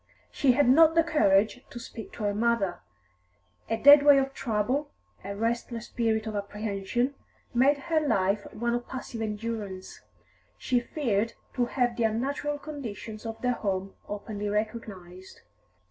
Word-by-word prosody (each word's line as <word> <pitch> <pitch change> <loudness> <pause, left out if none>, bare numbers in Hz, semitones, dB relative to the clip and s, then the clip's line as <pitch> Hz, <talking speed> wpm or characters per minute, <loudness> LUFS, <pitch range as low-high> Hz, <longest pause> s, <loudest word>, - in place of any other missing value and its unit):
She 265 -3 +3
had 285 +1 +3
not 320 +5 +6
the 330 - +5
courage 220 -6 +2
to 240 - -8
speak 235 -2 -9
to 220 - -6
her 205 0 +1
mother; 210 -5 0 0.9
a 225 - 0
deadweight 285 +2 +8
of 270 0 0
trouble, 250 +6 -1 0.3
a 200 +1 -5
restless 230 +1 -2
spirit 220 -2 -1
of 220 -1 -4
apprehension, 205 +4 -2 0.4
made 270 +4 +4
her 320 +3 0
life 200 -8 0
one 235 +2 -2
of 240 0 -3
passive 250 -3 -6
endurance; 210 -3 -5 0.6
she 250 -1 +1
feared 230 -5 -1 0.2
to 245 - +1
have 245 -2 0
the 235 - +1
unnatural 280 +6 -1
conditions 230 -7 -7
of 225 0 -6
their 250 - +2
home 195 -4 -3 0.2
openly 205 0 -4
recognised. 205 -4 -5
230 Hz, 145 wpm, -28 LUFS, 205-260 Hz, 0.9 s, deadweight